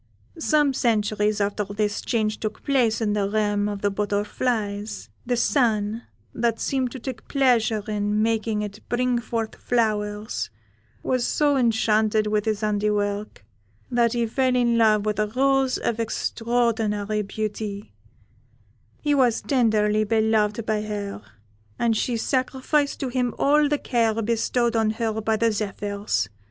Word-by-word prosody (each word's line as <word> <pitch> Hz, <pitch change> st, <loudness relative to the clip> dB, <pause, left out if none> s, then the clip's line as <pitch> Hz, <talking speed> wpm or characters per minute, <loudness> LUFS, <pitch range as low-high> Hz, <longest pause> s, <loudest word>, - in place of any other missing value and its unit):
Some 300 Hz, -3 st, +2 dB
centuries 210 Hz, -3 st, +1 dB
after 205 Hz, +1 st, 0 dB
this 205 Hz, +1 st, -2 dB
change 215 Hz, -3 st, -1 dB
took 215 Hz, -1 st, -5 dB
place 240 Hz, -5 st, +2 dB
in 210 Hz, -2 st, +1 dB
the 200 Hz, -1 st, 0 dB
realm 205 Hz, -1 st, +1 dB
of 205 Hz, -1 st, -5 dB
the 205 Hz, -, +2 dB
butterflies, 205 Hz, -, -2 dB, 0.2 s
the 245 Hz, -1 st, +1 dB
Sun, 225 Hz, -4 st, +1 dB, 0.3 s
that 230 Hz, -1 st, 0 dB
seemed 260 Hz, -2 st, 0 dB
to 260 Hz, -, -6 dB
take 250 Hz, -2 st, -7 dB
pleasure 235 Hz, -6 st, +2 dB
in 210 Hz, 0 st, 0 dB
making 220 Hz, -1 st, 0 dB
it 205 Hz, 0 st, -7 dB
bring 245 Hz, 0 st, +1 dB
forth 230 Hz, -2 st, -3 dB
flowers, 210 Hz, -3 st, -1 dB, 0.5 s
was 255 Hz, -2 st, 0 dB
so 290 Hz, -1 st, +2 dB
enchanted 220 Hz, -3 st, +2 dB
with 210 Hz, 0 st, 0 dB
his 215 Hz, -1 st, -1 dB
handiwork, 205 Hz, -, -1 dB, 0.5 s
that 240 Hz, -1 st, +2 dB
he 235 Hz, -1 st, +1 dB
fell 255 Hz, +3 st, +1 dB
in 240 Hz, -1 st, +2 dB
love 215 Hz, -2 st, +4 dB
with 210 Hz, -1 st, -1 dB
a 210 Hz, -, +2 dB
rose 265 Hz, +3 st, +2 dB
of 230 Hz, -1 st, -2 dB
extraordinary 225 Hz, -2 st, 0 dB
beauty; 210 Hz, -, -5 dB, 1.1 s
he 295 Hz, -1 st, +2 dB
was 255 Hz, -5 st, +3 dB
tenderly 215 Hz, -5 st, +2 dB
beloved 220 Hz, 0 st, +1 dB
by 215 Hz, -1 st, 0 dB
her, 205 Hz, -, -5 dB, 0.6 s
and 230 Hz, -1 st, +1 dB
she 235 Hz, +2 st, 0 dB
sacrificed 265 Hz, +4 st, 0 dB
to 265 Hz, -, -1 dB
him 245 Hz, -1 st, -1 dB
all 295 Hz, +1 st, +3 dB
the 295 Hz, -, +2 dB
care 230 Hz, -4 st, 0 dB
bestowed 235 Hz, +2 st, 0 dB
on 220 Hz, -1 st, +2 dB
her 220 Hz, 0 st, -2 dB
by 220 Hz, 0 st, +1 dB
the 230 Hz, +1 st, +2 dB
zephyrs. 205 Hz, -, -2 dB
220 Hz, 145 wpm, -24 LUFS, 210-240 Hz, 1.1 s, love